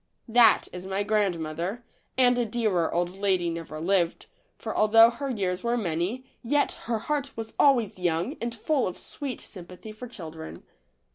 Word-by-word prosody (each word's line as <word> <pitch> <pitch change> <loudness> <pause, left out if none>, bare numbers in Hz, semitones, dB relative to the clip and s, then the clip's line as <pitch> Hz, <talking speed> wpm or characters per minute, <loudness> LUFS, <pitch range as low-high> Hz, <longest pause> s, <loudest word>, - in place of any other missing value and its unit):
That 230 -1 +6
is 180 +1 -7
my 195 +1 -1
grandmother, 190 0 -1 0.3
and 250 -1 +5
a - - +3
dearer 215 -7 0
old 175 +2 -1
lady 185 -4 +1
never 165 -2 -6
lived, 175 0 +1 0.3
for - - -5
although 225 +2 +7
her 275 +3 -5
years 190 -6 -1
were 240 0 0
many, 190 +6 -2 0.2
yet 285 +4 +1 0.2
her 230 - +2
heart 280 +3 -3
was 225 -1 -6
always 240 -9 +3
young 175 - 0
and 235 0 -3
full 275 +4 0
of 185 - -5
sweet 275 -4 -5
sympathy 180 +2 -8
for 215 +4 -9
children. 160 -8 -9
210 Hz, 160 wpm, -27 LUFS, 175-240 Hz, 0.3 s, although